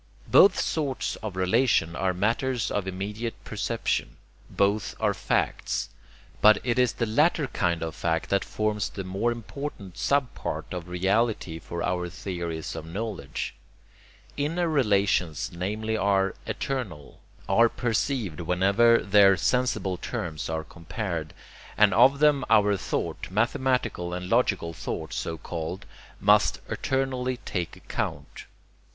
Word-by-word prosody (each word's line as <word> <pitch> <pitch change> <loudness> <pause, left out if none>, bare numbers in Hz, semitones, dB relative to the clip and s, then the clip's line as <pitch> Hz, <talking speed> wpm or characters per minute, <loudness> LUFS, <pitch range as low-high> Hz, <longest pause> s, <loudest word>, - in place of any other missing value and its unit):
Both 200 - +7
sorts 145 -5 -1
of 105 -4 -6
relation 95 -3 +2
are 95 +1 +1
matters 115 +6 0
of 100 -2 -1
immediate 105 +5 -4
perception. - - -2 0.3
Both 100 0 0
are - - +2
'facts.' - - -1 0.5
But 110 0 +7
it 120 0 +1
is 125 -2 +3
the 115 - -1
latter 150 +7 +2
kind 85 -9 -1
of 80 -1 -4
fact 80 -1 -1
that 100 - +2
forms 105 -1 -1
the 95 - -6
more 95 +6 -1
important 115 -5 -7
sub 140 -3 +1
part - - -4
of 90 -1 -5
reality 95 -1 0
for 85 +1 -5
our 90 -1 -1
theories 85 -4 -5
of 80 - -5
knowledge. 95 -3 -4 0.8
Inner 165 +5 0
relations 100 - +1
namely 105 +5 -2
are 100 -2 +2
'eternal,' 105 - -4 0.3
are 115 +4 +5
perceived 115 - -1
whenever 100 +7 +4
their 100 -1 +6
sensible 120 -7 0
terms 80 -2 -4
are 80 0 -2
compared; 85 0 -5 0.5
and 105 -3 +5
of 130 +7 +6
them 145 -2 +4
our 105 -2 +5
thought 95 - -3
mathematical 110 -4 0
and 90 0 -5
logical 100 -8 +2
thought, 80 -1 -5
so 80 - -3
called 85 +3 -5 0.3
must - - +4
eternally 130 -1 -1
take 90 -3 -3
account. - - -5
100 Hz, 130 wpm, -26 LUFS, 90-120 Hz, 0.8 s, Both